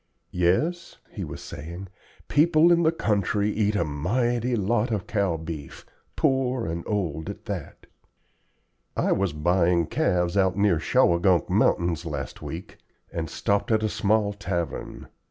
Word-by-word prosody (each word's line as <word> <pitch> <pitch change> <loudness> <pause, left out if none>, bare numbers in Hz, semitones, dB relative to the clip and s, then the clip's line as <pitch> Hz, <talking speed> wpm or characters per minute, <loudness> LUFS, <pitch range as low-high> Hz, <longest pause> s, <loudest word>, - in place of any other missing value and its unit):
"Yes," 120 - 0
he - - -5
was - - -7
saying, 85 +6 -8 0.4
"people 160 +2 +4
in 170 0 +5
the 160 -1 +4
country 105 - 0
eat 105 -1 0
a 90 - +2
mighty 120 - 0
lot 110 +3 +1
of 105 -5 -2
cow 100 -6 0
beef, 80 -3 -8 0.3
poor 130 -2 +1
and 85 +1 -3
old 85 -7 -2
at - - -8
that. - - -6 1.1
I - - +1
was 95 -2 +1
buying 85 +2 +2
calves 90 +2 0
out 95 -1 +2
near 100 -5 +3
Shawangunk 85 +2 +3
Mountains 85 -1 +2
last 70 -5 -5
week, 85 +3 -8 0.3
and 80 -2 -3
stopped 100 +4 0
at 110 0 +2
a 110 - +1
small 105 0 +1
tavern. 85 -4 -4
95 Hz, 140 wpm, -25 LUFS, 85-110 Hz, 1.1 s, in